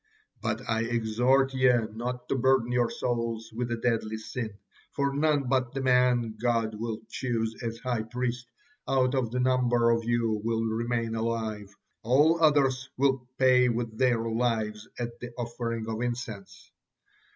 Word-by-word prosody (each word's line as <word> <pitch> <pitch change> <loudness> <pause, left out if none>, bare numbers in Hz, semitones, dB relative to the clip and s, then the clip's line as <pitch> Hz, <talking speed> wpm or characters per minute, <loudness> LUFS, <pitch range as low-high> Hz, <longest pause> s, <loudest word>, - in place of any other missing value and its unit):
But 110 +2 -3
I 110 0 +1
exhort 120 +4 +2
ye 130 -1 +4 0.2
not 125 +2 -4
to - - +1
burden 130 -2 +2
your 120 -1 +2
souls 115 -2 -3
with 120 +1 -3
a - - +1
deadly 115 -2 -1
sin, 110 0 -5 0.4
for 140 -1 0
none 150 -1 +2
but 130 -1 +1
the 135 - -1
man 125 -3 +3
God 115 -2 +1
will 110 0 -4
choose 115 -3 -2
as 115 -2 -3
high 120 -2 -2
priest 120 +2 -3 0.4
out 130 -1 +2
of 130 -4 0
the 125 +2 -2
number 125 -2 +3
of 115 0 +1
you 115 -2 0
will 115 0 0
remain 115 +1 -1
alive, 110 -3 -3 0.3
all 150 +8 +3
others 135 -4 +3
will 130 -2 +1
pay 125 -1 +5
with 115 -1 -2
their 120 -1 +2
lives 110 -2 -1
at 120 -1 -5
the 120 - -6
offering 115 -1 -3
of 110 0 -3
incense." 120 -5 -5
120 Hz, 155 wpm, -28 LUFS, 115-125 Hz, 0.4 s, pay